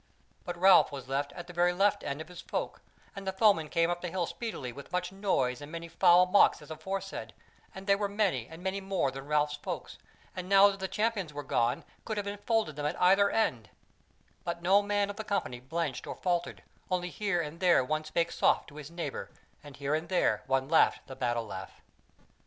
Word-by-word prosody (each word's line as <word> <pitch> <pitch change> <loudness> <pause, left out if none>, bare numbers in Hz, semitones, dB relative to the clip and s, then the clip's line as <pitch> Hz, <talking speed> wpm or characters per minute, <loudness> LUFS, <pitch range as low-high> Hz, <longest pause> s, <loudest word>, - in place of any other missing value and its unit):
But 175 -2 -4
Ralph 190 -2 +6
was 135 -2 -7
left 140 +2 -1
at 175 - -8
the 175 - -11
very 175 +1 +3
left 200 +2 +2
end 140 +3 -3
of 160 - -8
his 180 0 -10
folk, - - -4 0.3
and 195 -1 -7
the - - +1
foemen 190 -6 +3
came 165 +1 +2
up 175 0 -3
the 180 - -3
hill 180 0 -1
speedily 165 - -5
with 140 +6 -11
much 180 0 -1
noise 150 -11 0
and 145 +1 -9
many 170 0 -6
foul 175 +1 +5
mocks 190 +2 +5
as 150 0 -13
aforesaid, 190 +5 -5 0.4
and 190 0 -8
they 200 - +4
were 200 0 -2
many 195 - 0
and 165 +2 -11
many 190 +1 -2
more 190 -8 0
than 135 +1 -8
Ralph's 150 0 +1
folk, - - -5 0.4
and 185 0 -6
now 195 +1 +7
that 195 - -8
the 190 - -2
Champions 210 -7 -1
were 145 - -4
gone, 120 -2 0 0.2
could 220 -2 -4
have 205 - -2
enfolded 205 -5 -1
them 145 - -3
at - - -4
either 195 +3 +5
end; 125 - 0 0.7
but 170 0 -4
no 195 +3 +5
man 205 0 0
of 205 - -12
the 220 - -4
company 195 - -2
blenched 140 +1 -3
or - - -5
faltered, 175 -2 -2 0.3
only 180 -1 -1
here 200 -4 -1
and 160 0 -4
there 175 -7 +4
one 155 +3 -1
spake 165 +2 -1
soft - - +2
to 145 - -14
his 150 -1 -8
neighbour, 170 0 -5 0.3
and 145 -2 -12
here 140 +1 -2
and 160 +2 -1
there 185 - +2
one 135 0 +1
laughed 160 +2 +3
the 130 - -9
battle 120 -2 -1
laugh. 95 -2 -7
175 Hz, 215 wpm, -30 LUFS, 150-195 Hz, 0.7 s, now